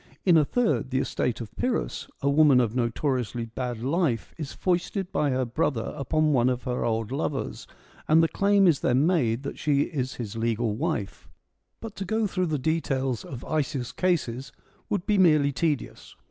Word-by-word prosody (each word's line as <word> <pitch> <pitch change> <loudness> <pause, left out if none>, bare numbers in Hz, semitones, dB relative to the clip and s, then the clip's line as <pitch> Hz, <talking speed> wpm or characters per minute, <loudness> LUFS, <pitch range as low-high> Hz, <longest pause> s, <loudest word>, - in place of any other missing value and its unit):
In 180 -3 +6
a 155 - +6
third, 220 - 0
the 130 - -1
estate 125 -2 -1
of 110 - -9
Pyrrhus, 250 -1 -2 0.2
a - - +2
woman 145 -3 +6
of 115 -3 +1
notori 125 +2 0
ously 120 0 -5
bad 120 0 -5
life 140 - 0
is 150 -4 -6
foisted 180 +1 -1
by 145 - +1
her 130 -1 0
brother 120 -1 -1
upon 155 +2 +1
one 125 -1 +3
of 125 -1 -2
her 125 -1 -2
old 115 0 -1
lovers, 140 0 -3 0.4
and 160 +1 +5
the - - +4
claim 200 +3 +3
is 165 -6 +4
then 130 +4 +2
made 135 -9 +1
that 140 - -6
she 145 -2 +2
is 135 -5 -2
his 115 -3 -6
legal 115 -1 0
wife. 120 - -3 0.5
But 225 -2 -8
to 195 - -4
go 220 +3 0
through 185 -2 -1
the 155 -2 0
details 135 -4 -1
of 125 -2 -8
Isaeus' 140 -5 -2
cases 135 -9 -1 0.4
would 200 -4 -1
be 210 -2 +2
merely 155 -6 +5
tedious. 145 +1 -3
140 Hz, 185 wpm, -26 LUFS, 125-165 Hz, 0.5 s, In